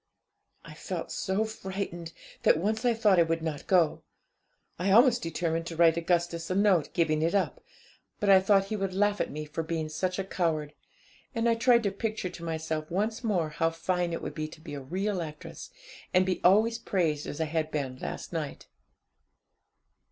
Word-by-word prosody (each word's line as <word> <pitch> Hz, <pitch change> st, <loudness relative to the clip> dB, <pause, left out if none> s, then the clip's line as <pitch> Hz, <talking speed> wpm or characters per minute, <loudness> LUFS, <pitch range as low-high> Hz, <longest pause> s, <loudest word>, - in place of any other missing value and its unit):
'I -, -, -10 dB
felt -, -, -5 dB
so 195 Hz, +3 st, 0 dB
frightened, 190 Hz, -5 st, -5 dB, 0.3 s
that -, -, +5 dB
once 215 Hz, +7 st, -1 dB
I 240 Hz, -1 st, +3 dB
thought 210 Hz, -5 st, +4 dB
I -, -, +7 dB
would 165 Hz, 0 st, 0 dB
not 155 Hz, -3 st, -4 dB
go. 175 Hz, -5 st, +3 dB, 0.8 s
I 185 Hz, +2 st, 0 dB
almost 240 Hz, +4 st, +6 dB
determined 165 Hz, -2 st, -2 dB
to 165 Hz, -, -5 dB
write 165 Hz, -1 st, +5 dB
Augustus 170 Hz, 0 st, 0 dB
a 185 Hz, -, 0 dB
note 190 Hz, -7 st, +3 dB
giving 155 Hz, -3 st, +2 dB
it 165 Hz, +5 st, +1 dB
up; 200 Hz, -, 0 dB, 0.6 s
but 205 Hz, -, -1 dB
I 195 Hz, -1 st, +8 dB
thought 195 Hz, 0 st, +4 dB
that 195 Hz, -, -13 dB
he 215 Hz, -, -1 dB
would 195 Hz, -2 st, -2 dB
laugh 205 Hz, +1 st, +2 dB
at -, -, -1 dB
me 150 Hz, +1 st, -5 dB
for 150 Hz, +2 st, -4 dB
being 160 Hz, -1 st, -3 dB
such 185 Hz, +4 st, -2 dB
a 195 Hz, -, -1 dB
coward, 160 Hz, -6 st, -1 dB, 0.6 s
and 230 Hz, 0 st, +1 dB
I 230 Hz, -, +4 dB
tried 235 Hz, 0 st, +4 dB
to 200 Hz, -, +1 dB
picture 215 Hz, -2 st, -3 dB
to 170 Hz, -, -10 dB
myself 160 Hz, -1 st, -3 dB
once 215 Hz, +6 st, -1 dB
more 180 Hz, -8 st, +1 dB
how 165 Hz, +2 st, +1 dB
fine 170 Hz, +1 st, -1 dB
it 165 Hz, -, -4 dB
would -, -, -4 dB
be 155 Hz, -1 st, -3 dB
to 155 Hz, -, -13 dB
be 155 Hz, -1 st, -9 dB
a 140 Hz, -, -5 dB
real 185 Hz, +7 st, -2 dB
actress, 150 Hz, -2 st, -8 dB, 0.5 s
and 185 Hz, +1 st, +5 dB
be 185 Hz, -1 st, -1 dB
always 220 Hz, +5 st, +4 dB
praised 165 Hz, -9 st, -1 dB
as 145 Hz, -, -6 dB
I 160 Hz, -, +1 dB
had 155 Hz, 0 st, -1 dB
been 135 Hz, -4 st, -3 dB
last -, -, -6 dB
night. 155 Hz, -4 st, -4 dB
175 Hz, 195 wpm, -29 LUFS, 160-200 Hz, 0.8 s, I